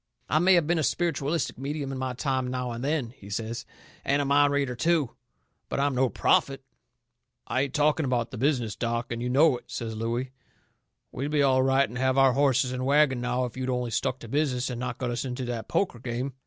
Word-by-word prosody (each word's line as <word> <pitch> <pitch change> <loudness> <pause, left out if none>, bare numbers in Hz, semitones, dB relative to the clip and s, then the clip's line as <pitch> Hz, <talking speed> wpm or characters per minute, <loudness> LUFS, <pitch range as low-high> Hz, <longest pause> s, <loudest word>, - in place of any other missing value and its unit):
I 155 - +2
may 185 +2 +5
have 170 -3 +3
been 170 +1 +1
a - - 0
spiritualistic 160 -3 -1
medium 140 0 -3
in 135 - -4
my 130 -1 -2
time 130 0 -1
now 125 -1 -3
and 115 +1 -5
then," 140 -5 -1
he 100 -5 -14
says, 115 +3 -4 0.4
"and 140 +1 +1
a 145 - 0
mind 145 +1 +4
reader, 140 -3 0
too, 160 -2 +1 0.6
but - - -2
I'm 140 0 +2
no 130 0 +2
prophet." 135 +2 +1 0.8
"I 130 - 0
ain't 140 0 -2
talking 150 +1 +2
about 125 -3 -1
the - - -7
business, 125 -6 0
Doc, 115 +1 -2
and 115 0 -3
you 125 - -2
know 140 +1 +4
it," - - -27
says 115 -1 -5
Looey. 120 +3 -2 0.8
"We'd 140 +3 -3
be 150 -1 +2
all 130 -1 +4
right 135 +1 +3
and 120 +3 -7
have 130 0 +1
our 135 -1 +5
horses 130 -2 +2
and 130 0 -3
wagon 140 -2 +3
now 125 +1 0
if 120 - -7
you'd 130 0 -3
only 125 -2 -1
stuck 125 +3 -1
to 115 - -8
business 130 -1 0
and 120 - -5
not 125 -1 -4
got 125 -2 -2
us 120 - -2
into 130 -1 -4
that 120 -2 -4
poker 175 -11 0
game. 125 +3 -4
130 Hz, 225 wpm, -27 LUFS, 125-140 Hz, 0.8 s, may